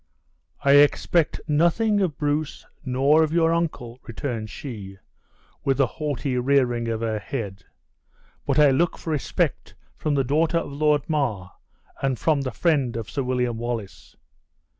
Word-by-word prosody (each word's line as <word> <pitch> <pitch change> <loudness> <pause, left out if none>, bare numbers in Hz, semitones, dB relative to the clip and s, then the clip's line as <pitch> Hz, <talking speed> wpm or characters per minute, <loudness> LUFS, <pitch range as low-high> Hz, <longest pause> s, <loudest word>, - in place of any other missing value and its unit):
"I 140 - +5
expect 145 +3 +3
nothing 175 +8 +2
of 170 -7 -1
Bruce, 150 0 -2 0.2
nor 140 +4 +3
of 155 -1 +1
your 165 0 +3
uncle," 140 -8 -3
returned 115 -2 -5
she, 105 -9 -8 0.7
with 135 0 +1
a 135 - +5
haughty 140 -2 -3
rearing 125 -3 +1
of 115 -1 -2
her 110 -2 -1
head; 100 -5 -6 0.8
"but - - +1
I 150 -2 +6
look 165 +6 +1
for 165 - -5
respect 150 -3 -2 0.2
from 150 -2 -1
the 135 - +2
daughter 155 +6 +1
of 165 - -3
Lord 150 -1 +1
Mar, 120 - -1 0.5
and 135 -2 0
from 150 +1 +1
the 135 - -2
friend 135 -5 +1
of 115 - -6
Sir 140 - -2
William 125 -2 -1
Wallace." 115 -4 -6
140 Hz, 150 wpm, -24 LUFS, 120-155 Hz, 0.8 s, I